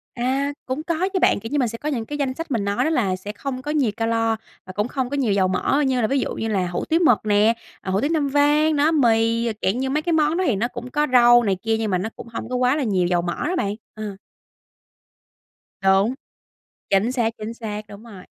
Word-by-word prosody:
À, 270 +4 0
cũng 260 +4 -3
có 340 +3 -1
chứ 375 - +1
bạn, - - +3
kiểu 225 +3 -7
như, 290 - +1
mình 250 - +2
sẽ 230 +1 -5
có 300 - -4
những 240 -6 -2
cái 290 +5 -5
danh 275 -3 -1
sách 330 +2 -7
mình 220 -5 0
nói 200 0 0
đó - - +1
là 215 -12 +1
sẽ 205 +3 -7
không 255 +4 -5
có 295 - -4
nhiều 280 -8 +1
ca-lo, 225 0 +1 0.3
và 185 - -9
cũng 210 +4 -1
không 255 -2 -3
có 285 - -2
nhiều 245 -7 +1
dầu 190 -1 +2
mỡ, 185 +10 +1
như 255 -2 +1
là 220 - +2
ví 275 +3 +1
dụ - - -2
như 225 - -3
là 195 -4 0
hủ 175 - -3
tiếu 325 +1 +2
mực 245 -8 +5
nè, 210 +2 +4 0.3
ờ, 190 - -4
hủ 195 +2 +1
tiếu 285 - 0
Nam 300 -3 +1
Vang. 295 +2 +3
Đó, 295 +2 +3
mì, 230 -5 +2
rồi 230 - -1
dạng 205 +6 0
như 265 0 -1
mấy 300 +3 0
cái 340 +2 -1
món 310 +1 +2
đó 375 - +1
thì 240 - +2
nó 220 +5 0
cũng 250 0 -8
có 295 +2 +1
rau 240 -1 +6
này 195 -3 +1
kia, 225 0 +1
nhưng 220 -2 -2
mà 185 - +2
nó 195 +5 -3
cũng - - -10
hông 230 0 -6
có 255 - -2
quá 250 +2 +2
là 300 - -1
nhiều 190 -6 +1
dầu 175 -1 +1
mỡ 175 0 -3
đó 365 - -1
bạn, 205 - -1 0.2
ờ. 215 -2 -6 1.7
Đúng. 195 +4 +3 0.8
Chính 200 +5 +2
xác, 235 -3 +1
chính 215 +2 -6
xác, 215 -3 -6
đúng 205 +2 -12
rồi. 200 -6 -12
235 Hz, 270 wpm, -22 LUFS, 210-280 Hz, 1.7 s, rau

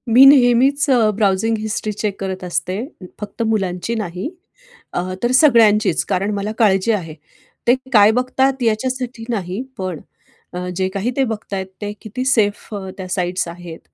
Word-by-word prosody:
मी 265 +2 +9
नेहमीच 270 +1 +5 0.3
browsing 210 +2 +1
history 215 0 -3
check 210 -1 -3
करत 190 -1 -4
असते 180 +1 -2 0.4
फक्त 210 +2 -6
मुलांची 210 0 -1
नाही 190 - -4 0.6
अ, 180 +1 -2
तर 240 - +2
सगळ्यांचीच, 225 - +4
कारण 195 +2 -1
मला 200 +1 -3
काळजी 200 0 +3
आहे. 170 -8 -3 0.5
ते 240 - +6 0.2
काय 210 0 +7
बघतात 260 +2 0
याच्यासाठी 245 +1 -2
नाही, 195 -1 -3 0.2
पण 185 -4 -4 0.5
अ, 180 - -4 0.2
जे 185 +1 0
काही 200 +5 -2
ते 270 - +3
बघत 210 -2 -6
आहेत 190 -1 -3
ते 205 - -3
किती 235 +4 -5
सेफ 215 -5 +1
अ, 190 -2 -6
त्या 185 -1 -6
साइट्स 180 -1 -1
आहेत. 170 -1 -9
210 Hz, 155 wpm, -19 LUFS, 190-235 Hz, 0.6 s, मी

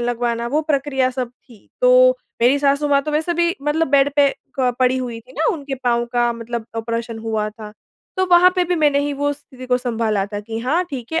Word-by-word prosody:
लगवाना 240 -1 -1
वो 300 +4 +1
प्रक्रिया 275 -3 0
सब 250 -1 -3
थी। 240 -3 -21
तो - - +6 0.3
मेरी 265 +4 +4
सासू-माँ 280 0 +2
तो 305 - -4
वैसे 320 +3 0
भी 340 +1 +1
मतलब 300 +2 0
बेड 280 0 +4
पे 285 -1 +5 0.3
क 250 -1 +2
पड़ी 255 0 +3
हुईं 240 -3 -5
थीं 250 +3 -19
ना 320 - +2
उनके 280 -4 -5
पाँव 235 -1 +2
का 240 -1 +2
मतलब 230 0 -6
ऑपरेशन 230 0 -3
हुआ 220 -1 -2
था। 210 -1 -11 0.4
तो 375 0 +1
वहाँ 355 +1 +7
पे 360 - +3
भी 355 +1 0
मैंने 295 -2 +3
ही 290 0 -1
वो 290 +1 0
स्थिति 260 -3 -12
को 250 0 +2
सँभाला 225 -5 -1
था 205 0 -5
कि 225 +2 -6
हाँ 305 +9 +1
ठीक 255 +1 -7
है 325 - +1
255 Hz, 220 wpm, -20 LUFS, 235-295 Hz, 0.4 s, वहाँ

